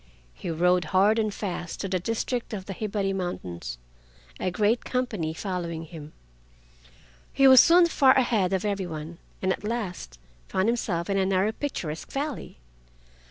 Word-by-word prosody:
He - - -7
rode 180 +2 +2
hard 200 +6 +3
and 215 -1 0
fast 180 -4 -5
to 195 - -2
the 185 -1 0
district 230 +5 -2
of 190 -2 -7
the 195 - -5
Hibari 200 -1 -2
Mountains, 90 - -5 0.6
a - - 0
great 210 +6 +1
company 220 -11 -2
following 170 -2 -4
him. 155 -2 -10 1.2
He 275 - +5
was 260 -1 +9
soon 345 +5 +7
far 270 -6 +4
ahead 225 -8 +2
of 190 +1 0
every 200 -3 -1
one, 160 +1 -7 0.2
and 190 0 +2
at - - -8
last 205 - -4 0.3
found 190 +2 0
himself 185 -8 -1
in 195 - 0
a 190 - +2
narrow 195 +2 +2
picturesque 180 - -5
valley. 285 - -4
195 Hz, 160 wpm, -26 LUFS, 175-225 Hz, 1.2 s, was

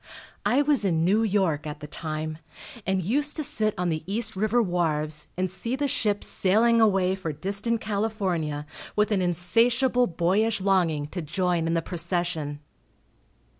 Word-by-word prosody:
I 275 +4 +3
was 290 -5 +3
in 165 -4 +1
New 205 +5 +3
York 190 -9 +1
at 150 0 -6
the 150 - -8
time, 155 +1 -5 0.5
and 190 -1 +1
used 290 - +1
to 310 - -2
sit 215 -5 0
on 180 0 0
the 155 -1 -1
East 220 0 -1
river 215 +5 +1
wharves, 155 -6 +1
and 185 +1 +1
see 190 +7 -4
the 285 +1 -1
ships 210 -6 0
sailing 225 +4 +3
away 195 -4 +3
for 185 -4 -4
distant 200 +8 -2
California 190 -9 -2 0.3
with 210 +1 +2
an 200 -3 +2
insatiable 235 +9 +2
boyish 195 +6 +1
longing 180 -6 +1
to 180 - -5
join 175 +1 0
in 165 - 0
the 165 - 0
procession. 170 -4 -2
190 Hz, 160 wpm, -26 LUFS, 165-220 Hz, 0.5 s, I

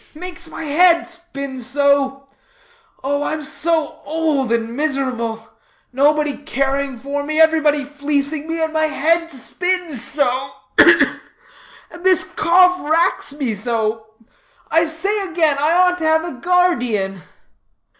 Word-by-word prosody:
Makes 350 0 -6
my 325 - -7
head 340 +3 +4
spin 305 -7 -7
so. 275 +2 +1 0.8
Oh, 285 +2 -1
I'm 305 +1 -3
so 310 +1 -1
old 305 -6 -1
and 230 0 -1
miserable, 255 -6 -2 0.4
nobody 295 +2 +2
caring 275 -2 -2
for 280 +4 -4
me, 310 +2 -2
everybody 310 -2 +3
fleecing 290 +1 -2
me, 330 0 -3
and 320 0 -2
my 315 0 +2
head 330 +3 +1
spins 340 0 -3
so 280 0 0 0.5
ugh, - - +9 0.2
ugh! - - +1 0.8
and 345 +1 -12
this 375 -1 +4
cough 360 +1 +3
racks 330 -2 +1
me 265 -6 -2
so. 220 0 -2 0.6
I 330 +1 +3
say 390 +6 -1
again, 320 -6 +1
I 300 +3 +2
ought 360 0 +3
to 320 - -2
have 320 0 +3
a 345 - -5
guard_ee_an." 250 - 0
300 Hz, 135 wpm, -19 LUFS, 270-330 Hz, 0.8 s, ugh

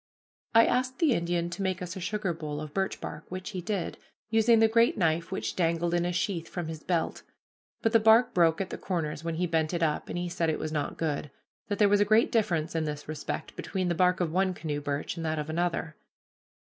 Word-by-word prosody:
I 230 - +8
asked 255 +1 0
the 320 -5 +3
Indian 170 -2 -1
to 180 +3 -5
make 185 -1 -1
us 180 -1 -5
a - - -5
sugar 200 0 -2
bowl 150 -2 -5
of 155 -1 -7
birch 195 -1 -1
bark, 150 +2 -7
which 185 +2 -5
he 185 -3 -4
did, 195 -1 -3 0.3
using 225 +1 +5
the 225 0 +6
great 230 +1 +3
knife 165 -2 +1
which 110 0 -3
dangled 170 -1 +1
in 175 0 +2
a 175 - 0
sheath 175 -1 -2
from 175 -3 -4
his 160 -1 -6
belt; 170 -2 -1 0.6
but 225 - +3
the 225 - +6
bark 220 +3 +5
broke 165 -2 +4
at 190 -1 -3
the - - -5
corners 160 -4 -3
when 165 -1 -2
he 180 +2 0
bent 160 0 0
it 170 - 0
up, 150 -2 0
and - - -3
he 175 0 -2
said 170 -1 -1
it 155 - 0
was 155 - -4
not 150 -2 -2
good 150 -2 -2 0.4
that 205 - -2
there 210 - +5
was 205 0 +4
a - - +5
great 215 +3 +4
difference 170 -8 +1
in 160 -1 0
this 150 -1 -5
respect 155 -1 -5
between 185 -2 -2
the - - +2
bark 180 +2 +3
of 175 -3 0
one 185 +1 +1
canoe 150 -3 -3
birch 145 +3 -3
and 165 - -4
that 160 -1 -1
of 150 +1 -3
another. 165 -1 -1
175 Hz, 240 wpm, -28 LUFS, 160-195 Hz, 0.6 s, I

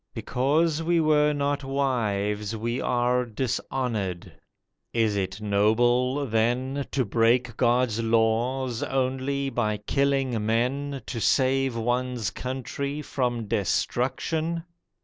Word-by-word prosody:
Because 150 +5 +1
we 170 +1 +2
were 150 -1 +4
not 145 -1 -1
wives 110 -6 -1
We 120 +3 -2
are 125 +1 +1
dishonoured. 115 -5 -3 0.6
Is 110 -3 +2
it 95 0 -2
noble, 120 +6 +2
then, 125 +4 0
To 130 -3 0
break 115 +2 +2
God's 120 -2 +2
laws 115 +2 +1
only 135 +1 -1
by 105 -4 0
killing 135 0 0
men 130 +5 -1
To 120 - -4
save 135 0 +2
one's 120 -1 -1
country 140 +3 -4
from 120 -5 -2
destruction? 155 - -1
125 Hz, 105 wpm, -26 LUFS, 115-135 Hz, 0.6 s, were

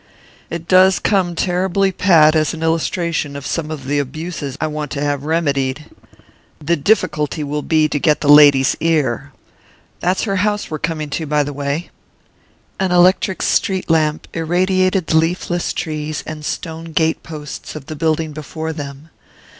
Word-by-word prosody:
"It 170 0 -6
does 185 0 +5
come 185 -4 +1
terribly 190 +2 +1
pat 165 -5 +4
as 155 0 +1
an 160 - -6
illustration 165 -2 -1
of 140 -1 -7
some 160 -2 -3
of 150 -4 -6
the 145 +2 0
abuses 145 0 -5
I - - 0
want 150 -1 -4
to 140 - -3
have 145 -1 -1
remedied. 145 -3 0 0.7
The 160 +3 0
difficulty 155 -3 0
will 150 +1 -3
be 155 0 +2
to 150 - -2
get 150 -1 +2
the 145 - -2
lady's 145 -2 +7
ear. 145 -4 0 0.7
That's 180 +2 0
her 195 -3 -1
house 205 0 -1
we're 155 - -3
coming 155 -2 -3
to, 160 +1 -3
by 150 0 +2
the 145 0 -5
way." 140 +4 -3 0.9
An 190 -1 0
electric 185 +1 +3
street 190 -3 0
lamp 155 -1 +1
irradiated 185 +2 +1
the 160 - +2
leafless 175 +1 0
trees 155 -1 -4
and 155 -1 -7
stone 165 +1 -5
gate 160 0 +1
posts 150 -3 -8
of 150 -3 -8
the 155 - -7
building 160 0 0
before 155 +2 -5
them. 145 0 -8
160 Hz, 160 wpm, -18 LUFS, 150-175 Hz, 0.9 s, lady's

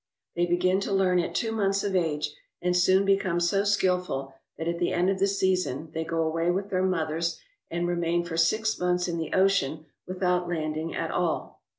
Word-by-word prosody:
They 175 0 +1
begin 185 +2 +2
to 200 - -3
learn 185 -2 +3
at 170 - -2
two 225 - 0
months 200 -3 +1
of 200 -2 -1
age, 150 -4 0 0.3
and 180 0 0
soon 185 +2 +4
become 195 -3 +2
so 185 +3 +2
skillful 180 -9 0 0.2
that 160 - -4
at 170 0 -1
the 175 - +1
end 180 +2 +2
of 190 - -2
the 195 - +3
season 185 -7 0
they 160 - -2
go 165 0 -1
away 165 +2 0
with 195 +3 -1
their 185 -1 +1
mothers 165 -2 -1 0.3
and 170 +1 -1
remain 175 0 0
for 170 -1 -5
six 215 +7 +1
months 180 0 +1
in 170 -1 -2
the 160 - -4
ocean 175 -6 +2 0.2
without 180 -1 0
landing 155 -1 -3
at - - -2
all. - - -2
180 Hz, 200 wpm, -27 LUFS, 165-190 Hz, 0.3 s, soon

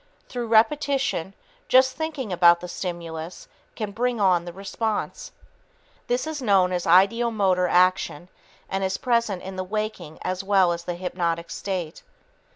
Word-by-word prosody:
Through 240 -2 -4
repetition, 230 - +1 0.3
just 260 0 +4
thinking 300 - -4
about 170 -1 +6
the 180 - -7
stimulus 170 -2 -6 0.3
can 215 -2 -4
bring 240 +2 -1
on 180 -4 +3
the 175 - -6
response. 205 +4 -4 0.8
This 245 +3 0
is 315 -2 -5
known 195 -6 +3
as 180 -1 -2
ideomotor 195 0 +3
action 180 -3 +2 0.4
and 195 0 -2
is 190 0 -1
present 235 -6 0
in 190 0 -7
the 185 - -2
waking 205 -5 -4
as 185 +1 -2
well 195 -3 +3
as 170 0 -4
the 175 - -3
hypnotic 170 -2 -3
state. 180 -5 -4
190 Hz, 145 wpm, -24 LUFS, 175-230 Hz, 0.8 s, about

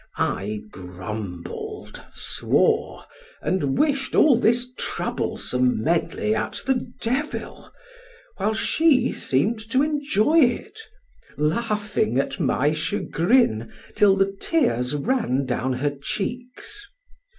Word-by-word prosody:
I 105 +2 -1
grumbled, 90 0 -7
swore, - - 0 0.4
and 145 -8 0
wished 280 -3 +1
all 300 -5 +6
this 240 +2 +2
troublesome 125 - -1
medley 170 +6 0
at - - -2
the 250 -2 -1
devil, 265 +6 -3 0.7
while 215 +2 0
she 270 +1 +3
seemed 195 - 0
to 260 +3 +3
enjoy 295 -1 +2
it, 325 - +1 0.6
laughing 210 - 0
at 140 - -1
my 145 +3 +2
chagrin 160 - +1 0.2
till 200 -2 +5
the 195 0 +1
tears 150 - +1
ran 145 - 0
down 130 +1 -1
her 140 +3 0
cheeks. 245 - -5
205 Hz, 100 wpm, -23 LUFS, -, 0.7 s, all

